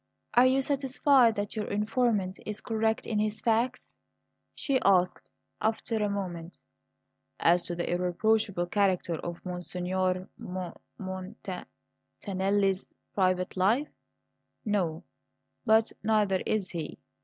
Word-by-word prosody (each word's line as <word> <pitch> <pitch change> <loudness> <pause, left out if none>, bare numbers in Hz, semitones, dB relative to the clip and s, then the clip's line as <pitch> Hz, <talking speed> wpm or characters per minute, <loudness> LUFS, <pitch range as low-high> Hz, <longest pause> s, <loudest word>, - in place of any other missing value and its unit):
"Are 245 +2 +7
you 265 +1 +3
satisfied 270 -3 +3
that 205 0 -3
your 215 -2 -2
informant 210 -2 0
is 210 0 -3
correct 220 0 0
in 215 -2 -1
his 215 0 0
facts?" 235 +3 0 0.6
she 275 -4 +1
asked 185 -2 +2 0.3
after 220 +1 0
a 205 - +1
moment. 180 -4 -4 0.8
"As 175 +1 +3
to 175 - -3
the 170 - -2
irreproachable 180 +2 +1
character 185 -3 +1
of 175 +3 -7
Monsignor 185 +1 -2
M 180 -1 -5 0.2
mon 185 -1 -6
t 195 - -4 0.7
tan 195 -3 -5
nelli's 195 0 +2 0.3
private 185 -2 +1
life? 220 +11 +2 0.8
No; 180 -7 0 0.6
but 220 +1 +5
neither 210 -3 +2
is 205 -3 0
he. 165 -4 -5
200 Hz, 120 wpm, -29 LUFS, 185-220 Hz, 0.8 s, Are